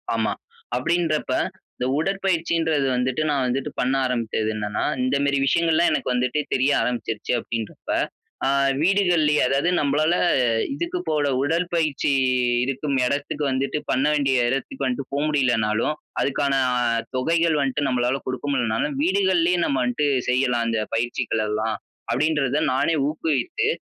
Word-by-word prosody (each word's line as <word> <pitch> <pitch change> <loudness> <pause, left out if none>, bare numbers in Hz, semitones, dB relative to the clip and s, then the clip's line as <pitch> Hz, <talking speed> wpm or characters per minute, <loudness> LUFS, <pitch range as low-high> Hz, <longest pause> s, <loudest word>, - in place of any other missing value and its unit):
ஆமா. - - 0 0.4
அப்பிடின்றப்ப 165 -6 0 0.4
இந்த 125 - -2
உடற்பயிற்சின்றது 165 -5 0
வந்துட்டு, 130 +4 0
நான் 135 -3 +1
வந்துட்டு 130 +2 -2
பண்ண 130 +2 +1
ஆரம்பிச்சது, 115 -3 -1
என்னன்னா. 105 -1 -2 0.2
இந்தமாரி 140 +2 +1
விஷயங்கள் 165 +3 +2
எல்லாம் 170 0 +3
எனக்கு 130 - -1
வந்துட்டு 125 +4 0
தெரிய 130 +3 +2
ஆரம்பிச்சிருச்சு 115 -3 -2
அப்பிடின்றப்ப, 115 -3 -6 0.6
ஆ - - +2 0.3
வீடுகள்லயே, 175 -5 +3
அதாவது 140 +6 +1
நம்மளால 150 +4 +2 0.6
இதுக்கு 340 +4 -3
போல 150 -2 +1
உடற்பயிற்சி 165 -2 0 0.5
இருக்கும் 135 +1 -1
இடத்துக்கு 145 +2 -2
வந்துட்டு 135 +3 -1
பண்ண 130 +3 +1
வேண்டிய 135 -4 +2
இடத்துக்கு 135 0 -3
வந்துட்டு 130 +1 -3
போக 140 - 0
முடியலனாலும், 120 -1 +1 0.3
அதற்கான 140 0 0 0.6
தொகைகள் 165 +3 +2
வந்துட்டு, 140 +1 0
நம்மளால 125 +2 0
கொடுக்க 130 +1 -4
முடியலனாலும், 125 +2 0
வீடுகள்லயே 180 -1 +2
நம்ம 135 -2 0
வந்துட்டு 130 +4 0 0.2
செய்யலாம். 125 -2 +1
இந்த 110 -1 0
பயிற்சிகள் 115 -1 -1
எல்லாம் 110 +1 -1 0.4
அப்பிடின்றத 145 +1 +1
நானே 165 +5 +1
ஊக்குவித்து, 160 - -1
140 Hz, 125 wpm, -23 LUFS, 125-160 Hz, 0.6 s, எல்லாம்